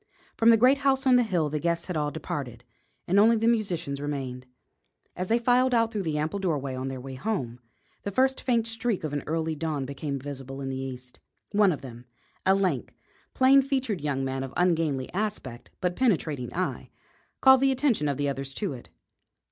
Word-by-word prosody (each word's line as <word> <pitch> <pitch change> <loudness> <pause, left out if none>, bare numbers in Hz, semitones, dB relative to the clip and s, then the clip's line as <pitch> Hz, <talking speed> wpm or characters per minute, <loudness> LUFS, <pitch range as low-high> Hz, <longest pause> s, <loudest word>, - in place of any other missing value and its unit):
From 230 - +4
the 230 - +7
great 255 +5 +5
house 270 0 +2
on 255 -1 +6
the 250 - +6
hill 180 -9 0
the 150 - -1
guests 170 +1 -1
had 180 - -4
all 150 -1 0
departed 130 -6 -5 0.4
and 190 +3 +4
only 225 +3 +6
the 225 +1 +1
musicians 180 -11 0
remained. 130 -3 -4 0.7
As 185 - -3
they 230 - +3
filed 245 +1 +3
out 230 -1 +2
through 210 -3 -2
the 160 -4 -2
ample 155 +7 -2
doorway, 145 -8 -1
on 130 +1 -4
their 135 -1 -5
way 135 +1 -8
home, 130 - -3 0.4
the - - -4
first 265 +6 +1
faint 235 -3 +1
streak 230 -3 -2
of 155 -2 -3
early 160 +1 -1
dawn 150 -3 -2
became 140 +1 -4
visible 135 -1 -7
in 135 -1 -4
the 135 - -3
east. 125 -1 -7 0.3
One 205 -2 +4
of 150 - -4
them, 120 -2 -10 0.4
a 190 - +6
lank, 185 -9 -1 0.4
plain 270 +1 +6
featured 260 - -1
young 140 -2 -1
man 130 0 -2
of 135 - -8
ungainly 160 -7 +1
aspect 190 - -4
but 180 -1 0
penetrating 155 - 0
eye, 185 +1 -3 0.5
called 265 -1 +7
the 270 0 +4
attention 255 - +1
of 140 -2 -1
the 145 0 0
others 135 -1 -4
to 200 -8 -2
it. 120 - -11
165 Hz, 195 wpm, -27 LUFS, 135-225 Hz, 0.7 s, the